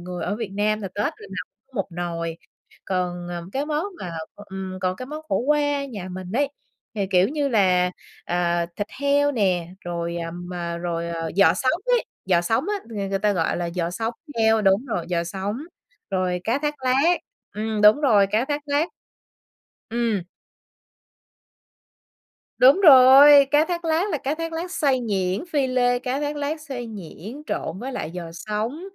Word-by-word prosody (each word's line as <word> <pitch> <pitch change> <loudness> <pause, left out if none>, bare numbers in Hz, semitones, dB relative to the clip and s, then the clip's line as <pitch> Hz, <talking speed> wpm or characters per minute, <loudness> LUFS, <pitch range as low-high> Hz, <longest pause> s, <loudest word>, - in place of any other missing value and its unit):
người 180 0 -5
ở 205 - -2
Việt 225 -3 -4
Nam 210 +2 0
là 195 - -4
Tết 205 +3 -3
lần 430 +8 -5
nào - - -4 0.2
cũng 270 - -31
một 195 - 0
nồi. 170 -1 -4 0.5
Còn, 180 -1 -2
ờ, 175 -1 -5
cái 280 +2 -1
món 305 +2 -1 0.2
mà, 175 - -5 0.2
ừm, 190 -2 -7
còn 185 0 -1
cái 255 - -7
món 305 +2 -7
khổ 195 - +1
qua 290 +1 +1
nhà 205 -9 -7
mình 185 0 -7
ấy, 280 +4 +2 0.5
thì, 200 -3 -1
kiểu 185 0 +4
như 290 -1 -1
là, 185 -5 +3 0.3
ờ, 175 -1 0
thịt 205 - -2
heo 285 +1 +3
nè, 185 -8 +1 0.2
rồi, 170 0 -3
à, 165 -1 -4
mà 175 -1 -5
rồi 170 -1 -3 0.3
giò 180 -4 +6
sống 260 - 0
ấy, - - +3 0.2
giò 180 -2 +3
sống 225 +6 0
á, 420 - 0
ng 205 -4 -4
người 195 - 0
ta 205 +1 +2
gọi 165 -4 0
là 175 -1 -2
giò 175 -1 -1
sống 225 +5 -3 0.2
heo. 220 -1 +4
Đúng 195 +6 +3
rồi, 175 -9 -3
giò 170 -1 0
sống, 195 +5 -3 0.5
rồi 185 -2 0
cá 230 +5 +1
thát 295 0 -1
lát, 275 +8 +4 0.4
ừm, 215 0 -2
đúng 210 +7 +7
rồi, 215 -9 +5
cá 215 +5 +1
thát 290 +1 -2
lát. 290 +3 +1 1.0
Ừm. 230 -4 0 2.4
Đúng 270 +9 +7
rồi, 280 -2 +9
cá 295 +2 +5
thát 345 0 -3
lát 330 +5 +1
là 305 - -1
cá 275 +2 -2
thát 330 +1 -4
lát 335 +2 -4
xay 280 -7 +1
nhuyễn, 195 - -1
phi 280 -3 +2
lê. 245 -1 +2
Cá 255 +2 -2
thát 295 0 -2
lát 295 +2 -2
xay 265 -6 -6
nhuyễn, 215 - -9
trộn 170 - -3
với 260 +5 -5
lại 160 - -4
giò 180 -1 -5
sống, 215 - -3
215 Hz, 185 wpm, -23 LUFS, 180-280 Hz, 2.4 s, rồi